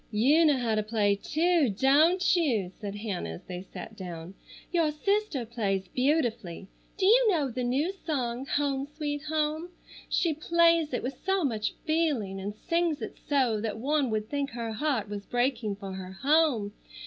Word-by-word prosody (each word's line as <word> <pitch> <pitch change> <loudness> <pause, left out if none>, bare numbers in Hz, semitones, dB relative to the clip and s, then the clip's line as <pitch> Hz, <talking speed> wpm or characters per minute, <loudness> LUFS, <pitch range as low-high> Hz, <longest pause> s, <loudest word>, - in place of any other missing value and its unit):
"You 265 +10 +4
know 295 -3 +4
how 235 -3 0
to 215 - +2
play, 210 -1 +1
too, 315 - +2
don't 305 - +4
you?" 235 - +1
said 205 -1 -5
Hannah 205 - -4
as - - -13
they 180 0 -6
sat 190 +3 -9
down. 175 -3 -7 0.4
"Your 335 -3 +2
sister 350 - -1
plays 200 -5 -2
beautifully. 240 - 0 0.3
Do 385 - +1
you 470 +4 +6
know 295 -7 0
the 250 +2 -3
new 270 +9 +1
song, 265 -8 -3
'Home, 280 -1 0
Sweet 295 -1 -4
Home?' 310 +2 -1 0.4
She 335 -3 +1
plays 335 0 +3
it 245 - -2
with 255 +1 -5
so 385 -1 +1
much 220 -6 -1
feeling 295 - 0
and 200 +2 -5
sings 335 +5 0
it - - -7
so 255 -7 +2
that 220 -1 -3
one 280 +2 +1
would 215 -1 -2
think 285 +2 -2
her 230 -2 -4
heart 255 -3 -1
was 205 -1 -6
breaking 245 -4 0
for 195 -1 -7
her 190 0 -7
home. 270 -4 +2
260 Hz, 170 wpm, -28 LUFS, 210-310 Hz, 0.4 s, you